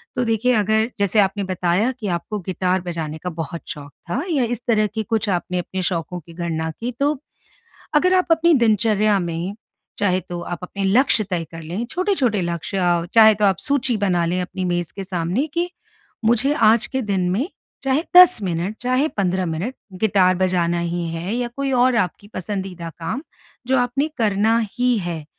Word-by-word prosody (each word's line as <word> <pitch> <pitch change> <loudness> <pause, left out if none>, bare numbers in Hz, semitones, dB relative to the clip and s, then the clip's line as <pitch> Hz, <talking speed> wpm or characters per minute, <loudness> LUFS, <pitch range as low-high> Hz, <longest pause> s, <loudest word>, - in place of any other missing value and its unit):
तो 250 - +1
देखिए 225 +2 +2
अगर 220 +2 +2
जैसे 200 +2 +2
आपने 200 +1 +2
बताया 185 +4 +1
कि 210 - -4
आपको 180 +4 -3
गिटार 185 0 0
बजाने 165 -3 -4
का 180 - -2
बहुत 165 -1 -5
शौक 145 -2 -7 0.2
था 250 +10 -1
या 280 -5 +2
इस 235 -1 -2
तरह 215 -3 +3
की 220 - -1
कुछ 225 -1 -1
आपने 180 0 -1
अपने 185 +2 -4
शौकों 175 -1 -2
की 165 +1 -15
गणना 165 -2 -3
की 240 +2 -3
तो 290 +1 +1 0.8
अगर 365 +5 +4
आप 365 -1 +3
अपनी 330 +1 +4
दिनचर्या 215 -4 +3
में, 170 +3 -3 0.4
चाहे 185 -2 +2
तो 175 -1 -7
आप 175 0 -5
अपने 195 +2 -4
लक्ष्य 220 +2 +3
तय 170 -2 -1
कर 165 -1 -9
लें, 180 +9 -4
छोटे-छोटे 315 - +1
लक्ष्य 175 0 -1
चाहे 220 -1 +8
तो 210 0 0
आप 190 -3 +3
सूची 265 -5 +1
बना 180 -4 +1
लें 180 +2 0
अपनी 185 +1 -5
मेज़ 175 -1 -1
के 195 - -4
सामने 185 - -1
कि 345 +1 0 0.5
मुझे 240 +5 +4 0.2
आज 230 - +1
के 265 0 -2
दिन 195 -4 0
में 245 - 0 0.3
चाहे 270 +3 +1
10 360 -4 +9
मिनट, 180 +3 -2
चाहे 255 +5 +1
15 185 - -1
मिनट 175 +11 -3 0.3
गिटार 190 -4 +4
बजाना 175 -2 +1
ही 170 0 -2
है 175 +7 -3
या 245 0 -1
कोई 275 -1 -1
और 250 -1 +3
आपकी 195 0 -1
पसंदीदा 185 -3 -5
काम 225 - -4 0.4
जो 260 +1 +2
आपने 250 +5 0
करना 220 +1 +2
ही 245 -1 +1
है 170 -4 -4
200 Hz, 185 wpm, -21 LUFS, 175-240 Hz, 0.8 s, 10